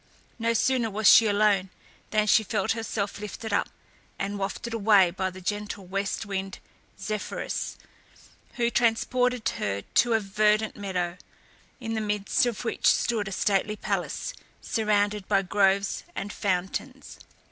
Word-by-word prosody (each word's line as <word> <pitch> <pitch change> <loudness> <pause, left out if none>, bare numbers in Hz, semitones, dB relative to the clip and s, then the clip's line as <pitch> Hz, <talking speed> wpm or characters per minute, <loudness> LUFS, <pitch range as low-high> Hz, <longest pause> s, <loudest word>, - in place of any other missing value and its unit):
No 230 0 +1
sooner 245 0 +2
was 215 +1 +1
she 225 - +8
alone 205 -2 +2 0.4
than 215 0 +2
she 215 - +5
felt 210 -2 -1
herself 225 -3 -3
lifted 210 +1 -6
up, - - +1 0.5
and 200 +1 -3
wafted 200 +4 -4
away 200 -5 +5
by 190 +1 -2
the 185 0 -11
gentle 205 +1 -4
west 195 +2 -2
wind 195 -1 -4 0.4
Zephyrus, 215 -1 -4 0.8
who 235 -1 0
transported 245 +1 +1
her 100 0 -2
to 240 -1 +2
a 225 - +4
verdant 210 +1 +1
meadow, 180 -3 -3 0.6
in 225 -3 -4
the 220 - -1
midst 210 +2 +1
of 240 0 -4
which - - 0
stood 220 -4 +2
a - - -5
stately 200 +2 +1
palace, - - -3 0.3
surrounded 210 -2 0
by 195 -1 +2
groves 195 +1 +1
and 200 +1 -4
fountains. 200 +8 -3
210 Hz, 140 wpm, -26 LUFS, 195-225 Hz, 0.8 s, she